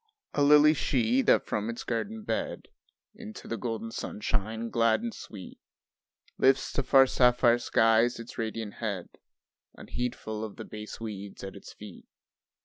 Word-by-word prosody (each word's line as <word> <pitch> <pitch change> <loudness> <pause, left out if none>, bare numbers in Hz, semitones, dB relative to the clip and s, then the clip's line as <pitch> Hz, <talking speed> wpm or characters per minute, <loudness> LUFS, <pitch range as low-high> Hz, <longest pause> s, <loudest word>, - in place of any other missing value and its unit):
A 145 - 0
lily 150 +1 +7
she 125 -3 +1
that - - +3
from 105 +2 -2
its 115 - -5
garden 210 - -3
bed, - - -3 0.4
Into 215 0 -10
the 115 - -2
golden 115 0 -4
sunshine 110 +2 -3
glad 115 - +2
and 235 -1 -3
sweet 100 - -10 0.8
Lifts 135 0 +3
to - - +1
far 135 +1 +6
sapphire 125 -2 +4
skies 115 +1 +3
its 115 +1 -9
radiant 110 -2 -4
head, 100 -6 -4 0.7
Unheedful 110 -3 -4
of 110 -2 -6
the - - -8
base 105 0 -8
weeds 100 -3 -7
at 95 0 -7
its 100 - -11
feet. 105 -3 -12
115 Hz, 145 wpm, -28 LUFS, 110-130 Hz, 0.8 s, lily